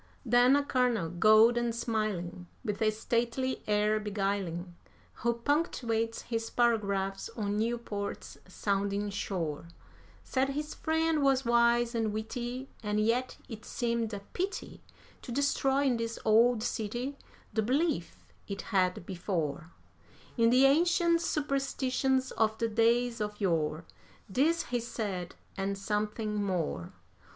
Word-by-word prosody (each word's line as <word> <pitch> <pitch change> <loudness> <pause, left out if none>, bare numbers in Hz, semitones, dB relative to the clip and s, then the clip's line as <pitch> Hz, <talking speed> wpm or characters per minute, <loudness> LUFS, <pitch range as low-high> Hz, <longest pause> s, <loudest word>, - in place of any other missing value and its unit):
Then 245 +3 +5
a 285 - +2
Colonel, 245 -11 +1
cold 215 +4 +6
and 240 -1 0
smiling, 210 -7 -2 0.2
with 210 -1 -3
a 220 - +4
stately 235 +4 -1
air 210 +1 +2
beguiling, 195 -4 -2 0.5
Who 235 +1 +2
punctuates 235 -4 -1
his 225 -1 -3
paragraphs 200 -5 0
on 205 -1 -1
Newport's 225 -3 -3
sounding 200 +2 -1
shore, 170 -6 -3 0.6
Said 265 +1 0
his 300 +2 -3
friend 320 -1 +1
was 270 -1 +3
wise 235 0 +3
and 225 -2 0
witty, 240 +4 -4
and 210 -1 -1
yet 235 +4 +1
it 220 -4 -8
seemed 235 -2 -1
a 200 -2 -5
pity 380 +3 -4 0.4
To 245 - -8
destroy 275 +1 +2
in 260 -4 +2
this 230 0 -3
old 225 +1 +4
city 240 +6 -3 0.4
the 220 - +2
belief 265 - 0 0.3
it 200 -1 -5
had 185 -2 +2
before 170 -4 -3 0.7
In 230 -1 +4
the 255 +3 +6
ancient 335 +3 +4
superstitions 270 -3 0
of 220 -1 +1
the 230 - 0
days 230 +1 +2
of 210 0 -3
yore. 165 -4 0 0.4
This 295 - +2
he 245 0 -2
said, 205 -6 -4 0.2
and 195 0 -2
something 210 +1 -2
more. 165 - -2
225 Hz, 125 wpm, -30 LUFS, 200-250 Hz, 0.7 s, cold